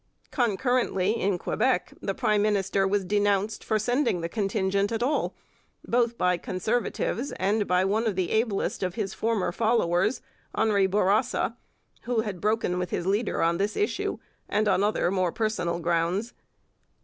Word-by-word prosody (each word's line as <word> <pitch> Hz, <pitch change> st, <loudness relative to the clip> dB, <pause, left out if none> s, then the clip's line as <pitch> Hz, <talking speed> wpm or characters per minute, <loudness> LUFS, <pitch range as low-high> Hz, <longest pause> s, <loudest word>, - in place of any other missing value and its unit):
Concurrently 240 Hz, -4 st, +1 dB
in 195 Hz, -1 st, +1 dB
Quebec 220 Hz, +2 st, 0 dB
the 195 Hz, -, -2 dB
prime 215 Hz, -5 st, +2 dB
minister 195 Hz, -2 st, +1 dB
was 200 Hz, 0 st, 0 dB
denounced 205 Hz, +1 st, +1 dB
for 220 Hz, -, +1 dB
sending 245 Hz, -3 st, +1 dB
the 165 Hz, -, -2 dB
contingent 200 Hz, 0 st, 0 dB
at 225 Hz, +1 st, -1 dB
all, 290 Hz, +4 st, 0 dB, 0.5 s
both 235 Hz, -1 st, +1 dB
by 180 Hz, -1 st, +2 dB
Conservatives 235 Hz, +6 st, -2 dB
and 205 Hz, +2 st, 0 dB
by 180 Hz, +1 st, +3 dB
one 220 Hz, +4 st, +1 dB
of 210 Hz, -, 0 dB
the 185 Hz, -2 st, -1 dB
ablest 220 Hz, -2 st, 0 dB
of 185 Hz, -1 st, -2 dB
his 195 Hz, -4 st, -3 dB
former 225 Hz, -5 st, 0 dB
followers, 205 Hz, -1 st, +1 dB, 0.3 s
Henri 200 Hz, -3 st, +3 dB
Bourassa, 210 Hz, +4 st, +1 dB, 0.5 s
who 240 Hz, -2 st, +1 dB
had 205 Hz, -5 st, -5 dB
broken 210 Hz, -4 st, 0 dB
with 180 Hz, -1 st, -2 dB
his 175 Hz, -, -2 dB
leader 205 Hz, +4 st, 0 dB
on 170 Hz, +1 st, +1 dB
this 205 Hz, +2 st, -1 dB
issue 415 Hz, -, -1 dB, 0.3 s
and 215 Hz, +1 st, +1 dB
on 190 Hz, -1 st, +3 dB
other 205 Hz, -4 st, +1 dB
more 185 Hz, -3 st, +1 dB
personal 215 Hz, -6 st, -1 dB
grounds. 170 Hz, +6 st, 0 dB
205 Hz, 155 wpm, -26 LUFS, 185-225 Hz, 0.5 s, by